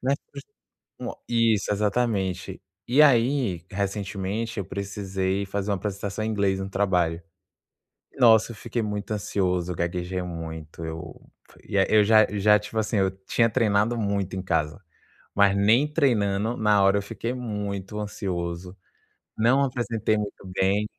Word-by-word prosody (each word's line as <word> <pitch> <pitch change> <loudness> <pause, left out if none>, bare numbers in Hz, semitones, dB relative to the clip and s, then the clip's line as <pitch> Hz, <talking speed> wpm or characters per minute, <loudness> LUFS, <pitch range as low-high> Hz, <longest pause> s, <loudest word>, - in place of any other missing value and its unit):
né, 135 +2 +2 0.2
frus 140 -1 -9 0.6
uma - - -6
Isso 115 -4 +2
,exatamente. 105 -3 -1 0.3
E, 135 +5 +5
aí, 120 - +3
recentemente, 100 +2 -3
eu - - -1
precisei 100 -1 -2
fazer 100 +1 -3
uma - - +2
apresentação 100 +1 -4
em 110 - -1
inglês 100 -2 +1
no 95 - -4
trabalho. 90 -4 +1 1.0
Nossa, 115 -1 +6
eu - - -9
fiquei 115 +3 -3
muito 105 -1 -4
ansioso, 90 -4 -1
gaguejei 90 +2 -2
muito, 80 -2 -7
eu 80 +1 -7 0.5
e - - -5
eu 105 +2 +5
j 110 +1 +6
já 105 - -2 0.2
já - - -5
tipo, 105 +1 -8
assim, 110 +1 -1
eu 95 -1 +2
tinha 115 - +3
treinado 110 +1 +2
muito 100 -3 -1
em 95 - -3
casa, 80 0 -1 0.5
mas 100 -1 +4
nem 115 +9 +4
treinando, 110 -7 +1
na 105 -2 +3
hora 95 +1 +4
eu - - -3
fiquei 115 +4 -4
muito 105 -4 -4
ansioso, 90 -3 -4 0.6
não 125 +5 +4
apresentei 115 -4 0
muito 105 -2 -5
bem 95 +3 +1
100 Hz, 145 wpm, -25 LUFS, 95-110 Hz, 1.0 s, Nossa